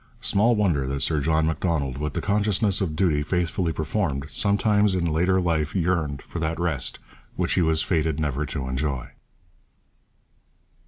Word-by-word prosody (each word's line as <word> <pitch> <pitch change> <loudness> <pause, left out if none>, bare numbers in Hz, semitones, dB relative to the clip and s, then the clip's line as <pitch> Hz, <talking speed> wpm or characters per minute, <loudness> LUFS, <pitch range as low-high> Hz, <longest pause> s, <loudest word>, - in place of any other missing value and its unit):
Small 115 +4 +3
wonder 85 -11 +1
that 70 0 -1
Sir 80 -2 +2
John 80 +2 +2
Macdonald, 80 -5 -1
with 75 -1 -3
the - - -2
consciousness 105 -1 +1
of 80 -5 -1
duty 80 -4 +2
faithfully 90 +2 -1
performed, 80 -4 -2
sometimes 105 -1 +2
in 90 -2 0
later 90 +4 +2
life 80 -3 -1
yearned 80 -6 0
for 85 - -7
that 80 +1 -2
rest 80 -8 0 0.4
which - - 0
he - - +2
was 80 -1 +2
fated 80 -3 0
never 75 -2 -1
to 65 -1 -4
enjoy. 65 -1 -2
80 Hz, 155 wpm, -24 LUFS, 75-95 Hz, 0.4 s, Small